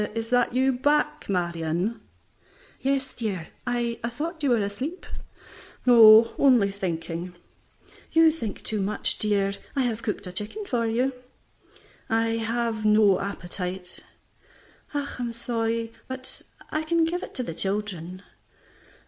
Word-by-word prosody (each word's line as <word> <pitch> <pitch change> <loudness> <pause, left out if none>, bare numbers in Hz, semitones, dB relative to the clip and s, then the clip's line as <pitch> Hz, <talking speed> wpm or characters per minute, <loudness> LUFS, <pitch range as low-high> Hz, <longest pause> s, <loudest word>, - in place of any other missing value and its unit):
"Is 225 +1 -3
that 245 -1 +3
you 260 +1 +3
back, 300 +3 +1
Marion?" 175 +3 -1 0.8
"Yes, 270 -1 -1
dear; 195 -8 -4 0.2
I 240 -1 -1
thought 310 +8 -4
you 285 - +1
were 240 - +4
asleep." 240 - -3 0.8
"No, 230 -2 +8
only 245 -8 +5
thinking." 175 -2 -4 0.8
"You 325 0 +6
think 230 -10 -6
too 215 -2 -1
much, 200 +2 -1
dear. 200 -2 +1 0.2
I 270 - +2
have 230 -2 -1
cooked 210 - -3
a 180 - -6
chicken 210 - -4
for 235 -9 0
you." 250 +4 +1 1.0
"I 225 0 +2
have 225 -1 -1
no 210 -2 +5
appetite." 180 -2 -4 0.9
"I'm 270 -5 -3
so - - -13
sorry, 230 -1 -1
but 260 0 -3 0.3
I 310 - 0
can 330 +1 +2
give 350 +2 -2
it - - -9
to 255 - -1
the 165 - -5
children." 185 -1 -2
225 Hz, 130 wpm, -26 LUFS, 200-260 Hz, 1.0 s, No